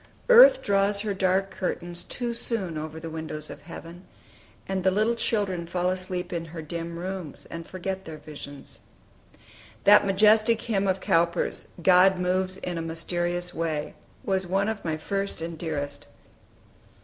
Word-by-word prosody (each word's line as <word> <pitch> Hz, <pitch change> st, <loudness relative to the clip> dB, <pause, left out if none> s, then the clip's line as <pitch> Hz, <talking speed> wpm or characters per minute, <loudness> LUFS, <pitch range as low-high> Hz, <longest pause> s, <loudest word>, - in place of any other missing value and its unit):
Earth -, -, +9 dB
draws 200 Hz, 0 st, +2 dB
her 210 Hz, -1 st, -1 dB
dark 190 Hz, 0 st, +1 dB
curtains 175 Hz, -2 st, -3 dB
too 240 Hz, -1 st, -3 dB
soon 210 Hz, -7 st, -2 dB
over 155 Hz, +1 st, -5 dB
the 165 Hz, 0 st, -7 dB
windows 155 Hz, -1 st, -6 dB
of -, -, -10 dB
heaven, 170 Hz, +2 st, -10 dB, 0.6 s
and 190 Hz, -1 st, -2 dB
the 190 Hz, -, +5 dB
little 215 Hz, +5 st, +2 dB
children 200 Hz, -7 st, -1 dB
fall 180 Hz, +1 st, 0 dB
asleep 185 Hz, -1 st, -3 dB
in 165 Hz, -1 st, -3 dB
her 165 Hz, 0 st, -7 dB
dim 170 Hz, +2 st, -5 dB
rooms, 180 Hz, -4 st, -6 dB
and 165 Hz, 0 st, -7 dB
forget 190 Hz, +1 st, -5 dB
their 160 Hz, -1 st, -7 dB
visions. 145 Hz, -2 st, -10 dB, 1.0 s
That 205 Hz, 0 st, +7 dB
majestic 215 Hz, +3 st, +4 dB
hymn 200 Hz, -4 st, 0 dB
of 190 Hz, 0 st, 0 dB
Cowper's, 170 Hz, -3 st, +1 dB, 0.2 s
"God 185 Hz, +1 st, +6 dB
moves 185 Hz, +1 st, 0 dB
in 175 Hz, -2 st, -4 dB
a -, -, -2 dB
mysterious 175 Hz, +2 st, -2 dB
way," 160 Hz, -2 st, -2 dB, 0.3 s
was 190 Hz, -2 st, 0 dB
one 195 Hz, +3 st, +1 dB
of 220 Hz, -2 st, -4 dB
my 160 Hz, -2 st, -1 dB
first 195 Hz, +4 st, -3 dB
and 165 Hz, +1 st, -5 dB
dearest. 145 Hz, -3 st, -4 dB
180 Hz, 155 wpm, -26 LUFS, 165-195 Hz, 1.0 s, Earth